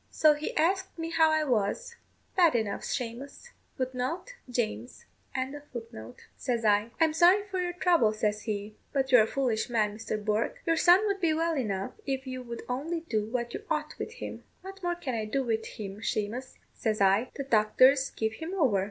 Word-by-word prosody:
So 310 -1 +5
he 295 +1 -4
asked 380 +4 +1
me 330 0 -4
how 325 -1 +5
I 315 0 +2
was. 235 - -1 0.4
'Bad 345 -7 +5
enough, 220 -4 -1
Shamous,' 260 - -5 2.9
says 235 -3 -1
I. 210 +1 +3
'I'm 320 -1 +4
sorry 365 +5 +5
for 380 -2 -2
your 355 0 -2
trouble,' 345 - +3
says 210 -1 -1
he; 210 -1 -3 0.2
'but 270 -1 0
you're 250 -3 +8
a 215 - +2
foolish 245 -2 0
man, 215 -3 +1
Mr. 215 0 -3
Bourke. 215 +1 -1
Your 330 - +3
son 355 +5 +6
would 400 -1 -1
be 320 -3 +2
well 330 +1 +1
enough 200 -8 -2 0.2
if 265 0 -2
you 255 -1 -5
would 235 -2 -7
only 305 +7 -2
do 220 -10 -1
what 235 0 -3
you - - -5
ought 305 -1 -1
with 455 - -5
him.' 480 - -7 0.2
'What 390 +1 -9
more 350 -1 0
can 285 -7 -4
I 220 -2 -1
do 265 +6 -1
with 225 -2 -1
him, 200 -2 -7
Shamous?' 230 +4 -3 0.2
says 220 -3 -1
I; 200 +5 +3
'the 275 - -3
doctors 260 +3 +4
give 220 0 -2
him 325 +10 -5
over.' 260 - +3
260 Hz, 180 wpm, -29 LUFS, 220-330 Hz, 2.9 s, you're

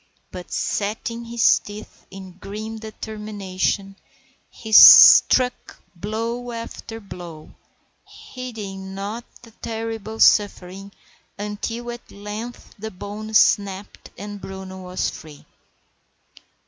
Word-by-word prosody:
But, 180 -1 -9
setting 225 +3 -3
his 235 0 +3
teeth 210 +1 -12
in 190 -1 -10
grim 215 +3 -7
determination, 205 -3 -4 0.5
he 220 - -11
struck 250 +3 +8 0.2
blow 230 +6 -4
after 230 -1 -8
blow, 175 -6 -11 0.5
heeding 200 -7 -8
not 210 +5 -6 0.2
the 230 - -15
terrible 225 -1 -6
suffering, 195 -1 +2 0.5
until 225 +4 -5
at 240 0 -11
length 210 +4 -8
the 220 +2 -5
bone 210 +3 -8
snapped 200 -1 +1
and 205 0 -8
Bruno 190 -1 -8
was 180 0 -3
free. 155 -2 -13
210 Hz, 95 wpm, -22 LUFS, 195-225 Hz, 0.5 s, struck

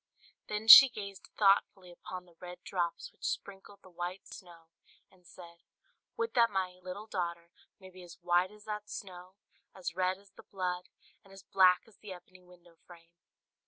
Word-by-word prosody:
Then 210 +1 -5
she 270 +4 +12
gazed 200 -5 -9
thoughtfully 195 -2 +2
upon 180 +1 -10
the 175 - -22
red 180 0 -11
drops 175 -3 -4
which - - -25
sprinkled 200 - -6
the 185 - -17
white 175 +2 -6
snow, 170 -3 -14 0.4
and 180 -2 -24
said, 170 -1 -15 0.6
"Would 460 0 -3
that 235 -2 +4
my 185 -2 -3
little 185 +3 -8
daughter 170 -4 -5 0.3
may 190 -1 -14
be 185 0 -14
as 175 -2 -13
white 175 +1 +2
as 210 +1 -17
that 210 -1 -6
snow, 185 -1 -10 0.4
as 180 -3 -5
red 185 0 0
as 200 0 -23
the - - -15
blood, 180 -2 -5 0.3
and 195 - -20
as 195 -1 -14
black 185 -2 +4
as 220 - -22
the 205 -3 -10
ebony 185 +1 -16
window 175 -1 -21
frame!" 170 -1 -17
185 Hz, 175 wpm, -31 LUFS, 175-200 Hz, 0.6 s, she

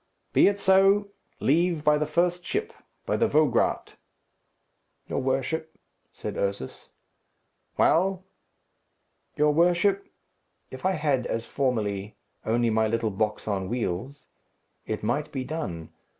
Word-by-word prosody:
"Be - - +6
it 200 0 +1
so. 195 +1 +4 0.3
Leave 165 +2 +2
by 150 -1 +4
the 150 - -1
first 175 +3 +1
ship 435 - -3 0.3
by - - 0
the 230 - +3
Vograat." 150 - +1 1.1
"Your - - -2
worship," 135 +5 -2 0.3
said - - -6
Ursus. 100 -9 -4 0.9
"Well?" 185 +2 +3 1.1
"Your 150 0 +3
worship, 180 +5 +2 0.6
if 130 +7 -3
I 190 - +2
had, 145 -6 0
as 115 0 -3
formerly, 105 -6 -2 0.3
only 115 +1 +2
my 110 0 +2
little 115 0 -1
box 105 +2 -2
on 95 -3 -2
wheels, 120 +4 -3 0.6
it 110 -1 -3
might 145 +7 -1
be 135 -3 -3
done. 95 - -5
145 Hz, 120 wpm, -26 LUFS, 110-175 Hz, 1.1 s, Be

